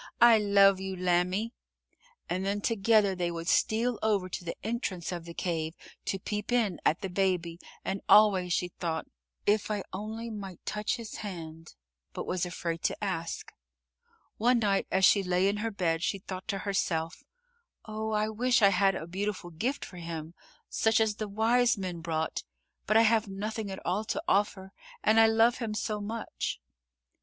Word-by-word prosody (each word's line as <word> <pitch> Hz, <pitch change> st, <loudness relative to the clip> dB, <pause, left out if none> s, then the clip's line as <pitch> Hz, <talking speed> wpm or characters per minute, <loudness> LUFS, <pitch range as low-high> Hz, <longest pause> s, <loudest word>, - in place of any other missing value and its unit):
I 235 Hz, -2 st, +8 dB
love 200 Hz, -2 st, +5 dB
you, 190 Hz, 0 st, -4 dB
lambie," 185 Hz, +5 st, +1 dB, 0.7 s
and 185 Hz, +2 st, -2 dB
then 200 Hz, +1 st, 0 dB
together 215 Hz, -2 st, +3 dB
they 180 Hz, -2 st, -1 dB
would 170 Hz, 0 st, -5 dB
steal 230 Hz, +4 st, +2 dB
over 200 Hz, -4 st, +1 dB
to 180 Hz, -, -5 dB
the 170 Hz, -, -4 dB
entrance 205 Hz, -6 st, -3 dB
of 175 Hz, -2 st, -5 dB
the 170 Hz, -, -8 dB
cave 160 Hz, -2 st, -2 dB, 0.3 s
to 195 Hz, -, -1 dB
peep 210 Hz, +3 st, -4 dB
in 225 Hz, -7 st, +1 dB
at 160 Hz, -, +2 dB
the 195 Hz, -, -2 dB
Baby, 180 Hz, -3 st, 0 dB, 0.3 s
and 195 Hz, +1 st, -2 dB
always 195 Hz, -4 st, +6 dB
she 180 Hz, 0 st, +1 dB
thought, 165 Hz, -2 st, -3 dB, 0.4 s
"If 210 Hz, +1 st, +2 dB
I 205 Hz, -2 st, -1 dB
only 220 Hz, +4 st, -5 dB
might 195 Hz, -4 st, -8 dB
touch 210 Hz, 0 st, -1 dB
his 230 Hz, -3 st, -7 dB
hand," 165 Hz, -5 st, -8 dB, 0.4 s
but -, -, -4 dB
was 180 Hz, -1 st, -1 dB
afraid 170 Hz, -2 st, -4 dB
to -, -, -1 dB
ask. 170 Hz, -4 st, -3 dB, 0.8 s
One 245 Hz, +3 st, +4 dB
night 205 Hz, -4 st, +1 dB
as 190 Hz, 0 st, +4 dB
she 200 Hz, -, +6 dB
lay 180 Hz, 0 st, +2 dB
in 200 Hz, +1 st, +1 dB
her 225 Hz, +2 st, -1 dB
bed, 170 Hz, -6 st, 0 dB
she 195 Hz, -, 0 dB
thought 185 Hz, 0 st, -8 dB
to 200 Hz, -, -1 dB
herself: 175 Hz, -, -1 dB, 0.6 s
"Oh, 220 Hz, 0 st, -4 dB
I 215 Hz, 0 st, +1 dB
wish 240 Hz, +2 st, +2 dB
I 200 Hz, -, +8 dB
had 195 Hz, 0 st, +3 dB
a 165 Hz, -, -4 dB
beautiful 190 Hz, 0 st, -4 dB
gift 240 Hz, -, -2 dB
for 180 Hz, -, -11 dB
him, 165 Hz, -1 st, -6 dB, 0.3 s
such 220 Hz, 0 st, +2 dB
as 215 Hz, -2 st, +1 dB
the 215 Hz, -, -3 dB
wise 230 Hz, +3 st, +3 dB
men 185 Hz, -3 st, -4 dB
brought, 160 Hz, -1 st, -2 dB, 0.5 s
but 215 Hz, -, +4 dB
I 225 Hz, -, +7 dB
have 220 Hz, -1 st, +3 dB
nothing 210 Hz, +2 st, -4 dB
at 190 Hz, -, -7 dB
all 185 Hz, +5 st, 0 dB
to -, -, -2 dB
offer 195 Hz, -1 st, +1 dB, 0.3 s
and 220 Hz, +1 st, +5 dB
I 225 Hz, -, +8 dB
love 225 Hz, +2 st, +4 dB
him 220 Hz, -3 st, -3 dB
so 215 Hz, 0 st, -2 dB
much." 220 Hz, +2 st, -4 dB
195 Hz, 180 wpm, -29 LUFS, 180-215 Hz, 0.8 s, I